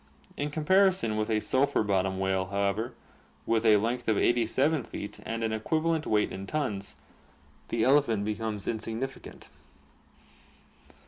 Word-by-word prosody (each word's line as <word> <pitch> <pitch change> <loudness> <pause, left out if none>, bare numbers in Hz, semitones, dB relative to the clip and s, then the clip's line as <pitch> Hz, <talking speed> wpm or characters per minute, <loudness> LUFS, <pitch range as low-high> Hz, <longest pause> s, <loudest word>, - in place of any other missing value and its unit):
In 145 +1 -2
comparison 180 - +2
with 110 +1 -1
a 110 -1 +2
sulphur 135 +2 +1
bottom 95 -2 0
whale, 95 0 0
however, 100 +5 -1 0.5
with 115 -1 +1
a 105 -1 +7
length 120 +4 -2
of 110 -2 +2
87 125 +5 +2
feet 100 - -7
and 115 0 -3
an 110 -1 0
equivalent 160 +8 0
weight 105 -1 +2
in 95 +1 -6
tons, 105 - -3 0.7
the 115 -1 0
elephant 125 -6 +3
becomes 105 -1 -3
insignificant. 115 - -5
110 Hz, 130 wpm, -28 LUFS, 105-135 Hz, 0.7 s, a